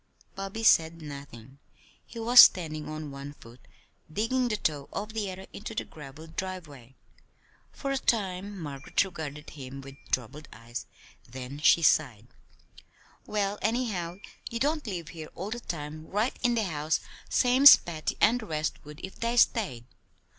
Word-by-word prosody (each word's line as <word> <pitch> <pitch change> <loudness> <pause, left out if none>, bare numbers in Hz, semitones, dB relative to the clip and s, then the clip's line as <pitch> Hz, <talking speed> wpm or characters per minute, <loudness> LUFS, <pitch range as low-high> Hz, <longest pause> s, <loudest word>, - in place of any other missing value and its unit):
Bobby 195 +3 -5
said 165 -5 +5
nothing. 140 -4 -10 0.4
He 235 - -13
was 240 +2 +6
standing 155 -4 +6
on 155 -1 -6
one 140 +1 -8
foot, 120 -3 -15 0.5
digging 245 +8 0
the 215 -3 -1
toe 145 -7 -2
of 210 +2 -5
the 210 -3 -2
other 190 +1 -9
into 215 +2 -7
the - - -1
graveled 155 +2 -12
driveway. 150 -10 -6 0.8
For 275 - -4
a 270 - 0
time 200 -4 -1
Margaret 145 -3 -1
regarded 155 -5 -7
him 135 -2 -8
with 135 0 -10 0.2
troubled 130 +5 -2
eyes; 115 +2 -8 0.4
then 130 +3 -7
she 165 +2 +5
sighed: 125 -10 +3 1.0
"Well, 205 -1 -1
anyhow, 210 -7 -1 0.3
you 235 - -4
don't 295 +2 0
live 175 -6 -4
here 160 -3 -8
all 195 +4 -5
the 240 - -3
time, 155 -5 -6
right 215 +5 0
in 245 -2 +2
the 225 - +1
house, 155 -4 -1 0.3
same's 260 +3 +8
Patty 155 -3 -4
and 245 +2 +4
the 220 - -8
rest 155 -2 -3
would 150 +2 -11
if 190 - -13
they 235 +1 -1
stayed. 185 - +2
165 Hz, 155 wpm, -28 LUFS, 145-215 Hz, 1.0 s, same's